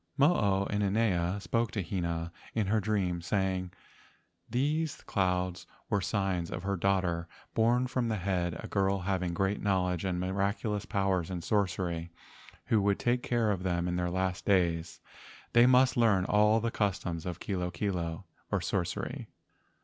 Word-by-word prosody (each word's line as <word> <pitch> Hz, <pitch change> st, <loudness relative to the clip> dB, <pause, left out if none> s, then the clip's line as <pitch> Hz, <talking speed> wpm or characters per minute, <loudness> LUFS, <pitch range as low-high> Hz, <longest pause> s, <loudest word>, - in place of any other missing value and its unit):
Mo 145 Hz, +5 st, +5 dB
o 100 Hz, -, +1 dB
inanea 100 Hz, -3 st, +1 dB
spoke 115 Hz, +3 st, 0 dB
to 100 Hz, -, -1 dB
Hina 85 Hz, -2 st, -2 dB, 0.2 s
in 110 Hz, -2 st, +1 dB
her 105 Hz, +3 st, +2 dB
dreams, 95 Hz, -5 st, -1 dB
say¬ 95 Hz, -2 st, +2 dB
ing 90 Hz, -, -2 dB
that 90 Hz, -, -19 dB, 0.7 s
these 150 Hz, +5 st, 0 dB
clouds 90 Hz, -2 st, -1 dB, 0.2 s
were 100 Hz, -, +2 dB
signs 95 Hz, -4 st, -1 dB
of 90 Hz, -, -5 dB
her 100 Hz, 0 st, 0 dB
daughter 90 Hz, -3 st, 0 dB, 0.3 s
born 120 Hz, +3 st, +3 dB
from 125 Hz, -1 st, -1 dB
the 110 Hz, -, 0 dB
head—a 90 Hz, -2 st, -2 dB
girl 100 Hz, -1 st, +1 dB
having 90 Hz, -2 st, -1 dB
great 95 Hz, +3 st, 0 dB
knowl¬ 95 Hz, -3 st, +2 dB
edge 90 Hz, -, -4 dB
and 90 Hz, -2 st, -1 dB
miraculous 100 Hz, +3 st, -1 dB
power 95 Hz, -2 st, +1 dB
in 85 Hz, 0 st, -5 dB
sorcery, 90 Hz, -4 st, -1 dB, 0.5 s
who 110 Hz, -, +3 dB
would 100 Hz, 0 st, +2 dB
take 120 Hz, +1 st, +1 dB
care 115 Hz, -4 st, +1 dB
of 95 Hz, -3 st, -2 dB
them 90 Hz, -1 st, 0 dB
in 90 Hz, -, -1 dB
their 90 Hz, 0 st, 0 dB
last 95 Hz, 0 st, -1 dB
days. 85 Hz, -4 st, +1 dB, 0.5 s
They 120 Hz, +1 st, +7 dB
must 130 Hz, +1 st, +5 dB
learn 110 Hz, -6 st, +3 dB
all 105 Hz, +2 st, +4 dB
the 115 Hz, +1 st, -1 dB
customs 90 Hz, -6 st, -1 dB
of 90 Hz, 0 st, -4 dB
kilo 90 Hz, -3 st, -2 dB
kilo, 90 Hz, -1 st, -3 dB, 0.3 s
or -, -, +2 dB
sorcery. -, -, -3 dB
95 Hz, 165 wpm, -30 LUFS, 90-105 Hz, 0.7 s, They